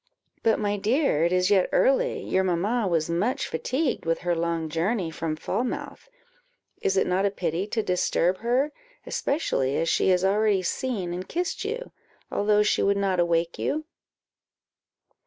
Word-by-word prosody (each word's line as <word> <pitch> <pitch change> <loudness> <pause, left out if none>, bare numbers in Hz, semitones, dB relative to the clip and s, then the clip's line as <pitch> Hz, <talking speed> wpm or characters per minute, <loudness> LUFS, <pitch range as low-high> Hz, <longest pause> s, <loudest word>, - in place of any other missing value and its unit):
"But, 225 - +3
my 205 -1 -1
dear, 215 - +2
it 170 - +1
is 180 +2 +2
yet 190 -3 +4
early; - - +2
your 190 - +1
mamma 195 +6 0
was 165 -3 +1
much 190 +10 0
fatigued 260 - -1
with 165 0 -1
her 175 -1 0
long 165 -1 -1
journey 170 +3 -1
from 160 -1 -3
Falmouth: 240 - -4 0.7
is 195 - +1
it - - +3
not 185 +2 +1
a - - +1
pity 180 -1 -2
to 220 0 -1
disturb 180 0 +1
her, 250 +6 +1 0.3
especially 140 - -1
as 165 0 0
she - - +2
has 185 0 +3
already 200 -1 +2
seen 190 -3 -2
and 185 +1 -6
kissed 355 +4 -2
you, 470 +4 -4 0.4
although 210 0 +3
she 210 - +1
would 200 0 +2
not 195 -2 0
awake 170 -1 +1
you?" 310 +1 -1
190 Hz, 160 wpm, -26 LUFS, 170-235 Hz, 0.7 s, yet